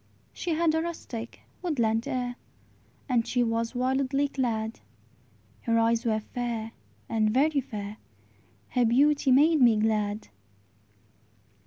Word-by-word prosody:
She 335 -3 -2
had 325 -1 +2
a 320 - +1
rustic, 245 -9 -6 0.2
woodland 235 -10 0
air, 245 -1 -2 0.7
And 240 -4 +1
she 245 -1 +1
was 230 +1 -1
wildly 265 +2 +1
clad; 225 -5 -2 0.8
Her 230 -1 +1
eyes 230 +1 +2
were 220 -1 +1
fair, 230 0 -4 0.4
and 215 -1 +1
very 280 +5 +2
fair; 210 -4 -7 0.7
Her 250 -1 +2
beauty 280 +4 +3
made 300 +3 +5
me 235 -3 +6
glad. 215 -1 0
240 Hz, 120 wpm, -27 LUFS, 225-275 Hz, 0.8 s, me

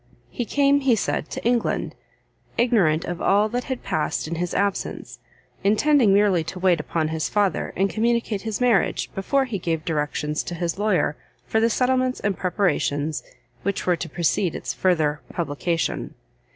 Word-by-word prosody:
He 240 - -3
came, 280 +4 +3
he 265 -4 +3
said, 215 - -2
to - - -6
England, 240 -1 0 0.6
ignorant 200 -10 +3
of 175 0 -4
all 205 +2 +3
that 245 +2 -2
had 260 -2 -4
past 155 0 -1
in 165 - -4
his 175 +1 -2
absence, 200 -1 -2 0.4
intending 220 +3 +4
merely 195 -4 +4
to 185 - -6
wait 180 -2 +3
upon 155 +1 -1
his 160 -1 -2
father, 205 -4 0
and 195 +2 +2
communicate 230 -1 0
his 220 -1 -3
marriage, 240 -6 +2
before 270 +8 +1
he 225 -6 -4
gave 165 -2 -2
directions 150 -1 -1
to 175 - -6
his 170 +2 -2
lawyer 205 -7 +1 0.3
for 220 - +1
the 230 +1 +3
settlements 255 +2 +1
and 200 -1 -1
preparations 160 -6 0 0.4
which 200 -1 -2
were 180 - +3
to 165 0 -6
precede 170 +2 0
its - - -4
further 155 -5 +1
publication. 165 0 -2
195 Hz, 165 wpm, -23 LUFS, 165-230 Hz, 0.6 s, intending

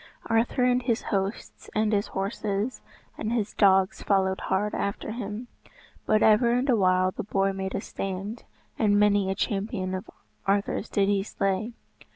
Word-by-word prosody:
Arthur 230 +3 +1
and 250 0 +3
his 240 -2 0
hosts, 195 +2 -3
and 215 0 +2
his 205 0 +1
horses, 200 +3 -2 0.4
and 220 - -2
his 220 -3 -1
dogs 190 -2 +3
followed 190 -1 +1
hard 205 +2 0
after 200 +2 -3
him. 220 +1 -5 0.6
But 215 - +3
ever 220 +2 +5
and 250 +3 +1
awhile 185 -6 +3
the - - -5
boar 195 -1 0
made 190 0 -4
a - - -1
stand, 195 +5 -5 0.4
and 205 -2 +4
many 205 -2 +3
a 190 - 0
champion 195 -1 -2
of 185 0 -5 0.4
Arthur's 200 +2 0
did 200 -2 +2
he 200 -1 +2
slay. 195 +3 -2
205 Hz, 160 wpm, -27 LUFS, 195-220 Hz, 0.6 s, ever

